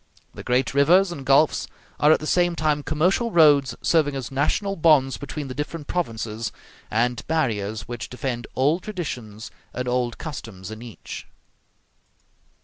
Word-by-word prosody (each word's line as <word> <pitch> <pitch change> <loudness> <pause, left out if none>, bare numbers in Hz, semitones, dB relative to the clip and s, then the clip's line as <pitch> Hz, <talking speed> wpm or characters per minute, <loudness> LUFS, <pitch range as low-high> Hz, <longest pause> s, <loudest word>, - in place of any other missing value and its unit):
The - - -8
great 125 +2 +1
rivers 175 +7 +5
and 145 -6 -6
gulfs 140 +3 +3 0.3
are 150 - +5
at - - +5
the 155 - -6
same 175 +1 +2
time 155 -2 +1
commercial 175 - +1
roads 145 - +5
serving 150 -4 +2
as 130 -3 -5
national 175 +9 0
bonds 150 -6 +4
between 145 0 -6
the 130 - -5
different 150 +2 -5
provinces, 115 -9 -3 0.4
and 120 +2 0
barriers 110 -9 -1
which 120 -1 -6
defend 125 -2 -4
old 150 +7 +2
traditions 125 - -6 0.2
and 125 0 -3
old 125 -1 0
customs 110 - -7
in 110 +1 -8
each. 120 -3 -9
140 Hz, 145 wpm, -24 LUFS, 120-160 Hz, 0.4 s, rivers